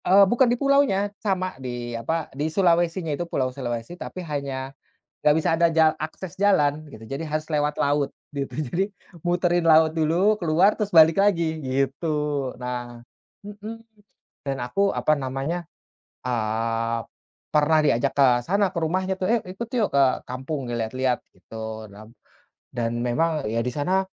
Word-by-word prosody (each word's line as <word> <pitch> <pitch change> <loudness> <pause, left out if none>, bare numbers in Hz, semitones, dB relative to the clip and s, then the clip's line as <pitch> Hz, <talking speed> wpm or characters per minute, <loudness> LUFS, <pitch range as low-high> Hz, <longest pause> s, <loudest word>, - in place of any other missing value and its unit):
Eee, 195 +2 +7
bukan 240 +5 +3
di 240 - +1
pulaunya, 275 -8 +2
sama 185 -3 -1
di 120 -2 -5
apa 150 +8 -2
di 145 +3 -2
Sulawesi-nya 170 -1 +2
itu 170 +4 -4
Pulau 130 -4 -1
Sulawesi 120 +1 -4
tapi 180 0 -7
hanya 140 -3 -4 0.5
enggak 150 - +6
bisa - - -1
ada 170 +1 +4
jal 160 -1 +4
akses 170 +4 -7
jalan 155 -7 +2
gitu. 110 - -11
Jadi 135 +4 -4
harus 155 0 -3
lewat 150 -1 0
laut 145 0 +1 0.2
gitu, 140 -1 -3
jadi 175 +8 -2 0.3
muterin 175 0 +1
laut 160 0 +5
dulu, 170 +7 +3
keluar 175 +2 +3
terus 210 -1 -2
balik 160 -1 +7
lagi 170 -6 +2
gitu 135 +4 -1 0.5
nah 120 -1 -5 0.4
mhm, 210 +2 -8 0.7
dan 135 -1 -1
aku 195 +11 +1
apa - - +1
namanya, 140 +5 -3 0.6
eee, 115 0 -1 0.6
pernah 155 +1 +4
diajak 135 -2 +2
ke 140 -2 +5 0.2
sana 200 - +1
ke - - -2
rumahnya 185 +4 0
tuh, 185 - -3
"Ayuk, 235 -2 +1
ikut 195 +6 -6
yuk 215 - +2
ke 140 - +6 0.2
kampung 130 +2 -4
lihat-lihat," 125 +2 -1
gitu, 110 -1 -8
dam 110 +2 -13 0.6
dan 115 -1 -1
memang 155 +5 0
ya 115 - 0
di 125 - -1
sana 185 +6 +1
155 Hz, 155 wpm, -24 LUFS, 130-185 Hz, 0.7 s, Eee